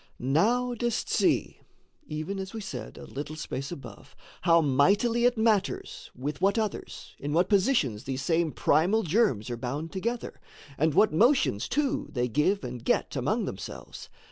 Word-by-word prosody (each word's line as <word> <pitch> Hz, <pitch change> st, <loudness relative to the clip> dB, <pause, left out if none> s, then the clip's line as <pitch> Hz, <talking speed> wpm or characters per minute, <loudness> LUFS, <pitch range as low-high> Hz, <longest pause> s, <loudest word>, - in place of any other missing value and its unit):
Now 225 Hz, -, +2 dB
dost 240 Hz, 0 st, -2 dB
see -, -, +1 dB, 0.5 s
(Even 155 Hz, +6 st, -4 dB
as 190 Hz, +3 st, -6 dB
we -, -, -3 dB
said 130 Hz, -, -7 dB
a -, -, -9 dB
little 145 Hz, +3 st, -6 dB
space 140 Hz, -2 st, -5 dB
above) 120 Hz, -11 st, -10 dB, 0.3 s
How 170 Hz, -1 st, +5 dB
mightily 200 Hz, -, +3 dB
it 245 Hz, -1 st, +3 dB
matters 220 Hz, -3 st, 0 dB
with 140 Hz, +4 st, -5 dB
what 200 Hz, +3 st, +3 dB
others, 215 Hz, -3 st, -4 dB
In 145 Hz, +1 st, -3 dB
what 175 Hz, +3 st, +2 dB
positions 190 Hz, -, +2 dB
these 135 Hz, 0 st, -3 dB
same 165 Hz, +1 st, +1 dB
primal 180 Hz, +13 st, +2 dB
germs 150 Hz, -, +1 dB
Are 120 Hz, -, -3 dB
bound 140 Hz, +7 st, -4 dB
together? 235 Hz, +5 st, -4 dB, 0.3 s
And 155 Hz, +1 st, +1 dB
what 215 Hz, -6 st, +5 dB
motions, 220 Hz, -, +3 dB
too, 285 Hz, -1 st, 0 dB
They 125 Hz, -1 st, 0 dB
give 150 Hz, -, +1 dB
and 125 Hz, -1 st, -6 dB
get -, -, 0 dB
among -, -, 0 dB
themselves? -, -, -8 dB
165 Hz, 160 wpm, -28 LUFS, 135-220 Hz, 0.5 s, How